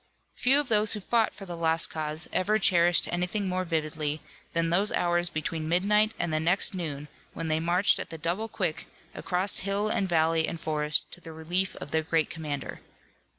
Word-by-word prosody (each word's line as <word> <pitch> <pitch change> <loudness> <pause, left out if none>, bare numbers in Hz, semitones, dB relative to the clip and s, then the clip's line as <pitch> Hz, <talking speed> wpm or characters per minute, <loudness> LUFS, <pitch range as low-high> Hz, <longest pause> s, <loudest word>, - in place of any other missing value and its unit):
Few 270 +3 +3
of 295 - -2
those 215 -2 +4
who 210 - -2
fought 225 +3 +1
for 195 - -9
the 175 -2 -6
Lost 165 0 +2
Cause 155 +1 -4
ever 210 +4 +2
cherished 175 -4 +4
anything 180 +3 -1
more 185 0 -1
vividly 155 -3 -2 0.3
than 165 0 0
those 195 +4 +3
hours 175 0 +1
between 155 0 -3
midnight 210 +5 +2
and 170 -2 -2
the 155 - +1
next 180 +6 +2
noon 150 -5 -5 0.3
when 165 -1 -4
they 155 0 +1
marched 175 +4 +3
at - - -5
the 165 - -7
double 175 +8 -2
quick 180 -7 -3 0.3
across 185 +2 0
hill 200 +2 0
and 195 -3 0
valley 160 -1 +2
and 165 - -5
forest 150 -1 0
to 175 - -10
the 165 - -10
relief 175 +4 -1
of 145 - -9
their 160 - +2
great 160 0 0
commander. 150 -4 -5
170 Hz, 195 wpm, -27 LUFS, 160-195 Hz, 0.3 s, those